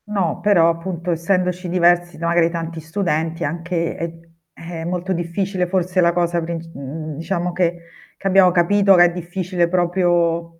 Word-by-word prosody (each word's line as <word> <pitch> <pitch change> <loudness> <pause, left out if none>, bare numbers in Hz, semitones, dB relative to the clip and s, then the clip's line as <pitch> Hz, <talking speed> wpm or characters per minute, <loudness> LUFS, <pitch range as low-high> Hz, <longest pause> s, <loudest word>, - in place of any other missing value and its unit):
No, 195 -7 -1
però, 185 -5 +4
appunto 170 +1 -3
essendoci 180 +1 -1
diversi 175 0 +2
da 170 - -4
magari 170 0 +3
tanti 165 -1 -5
studenti 165 0 -2
è - - 0
anche 170 +2 -2
è 165 0 -7 0.2
è 165 0 -8
molto 180 +2 -2
difficile 180 +2 -2
forse 185 0 0
la 170 0 +4
cosa 170 0 0
princ 165 0 -5
mhmm, 150 +3 -6
diciamo 175 +1 -2
che 175 -1 0 0.4
che 195 - -4
abbiamo 190 -1 +5
capito 195 +3 +4
che 175 0 +7
è 175 - +2
difficile 175 0 -2
proprio 170 -2 0
175 Hz, 165 wpm, -20 LUFS, 165-180 Hz, 0.4 s, che